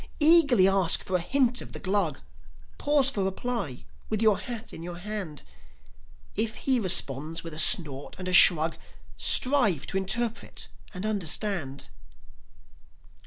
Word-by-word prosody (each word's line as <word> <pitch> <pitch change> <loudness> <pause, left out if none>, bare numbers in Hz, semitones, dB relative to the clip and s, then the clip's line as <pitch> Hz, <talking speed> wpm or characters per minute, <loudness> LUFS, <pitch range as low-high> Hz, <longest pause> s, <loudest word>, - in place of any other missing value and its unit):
Eagerly 295 - +6
ask 195 -3 +2
for 185 - -4
a - - +2
hint 250 +4 0
of - - -12
the - - -7
Glug, 190 -4 -2 0.6
Pause 285 -2 +2
for 200 -6 -3
reply 190 - -4 0.2
with 215 - -2
your 215 -2 +2
hat 240 -3 -8
in - - -9
your 175 +1 -8
hand; 190 -5 -6 0.9
If 220 +1 -1
he 260 +1 0
responds 165 - -2
with 165 -2 -8
a 155 - -6
snort 145 -5 +2
and 185 0 -7
a 185 - -3
shrug 165 -2 +5 0.4
Strive 250 - +3
to 195 - -3
interpret 225 +4 -3 0.2
and 185 +3 -7
understand. 190 -7 -2
195 Hz, 140 wpm, -26 LUFS, 170-235 Hz, 0.9 s, Eagerly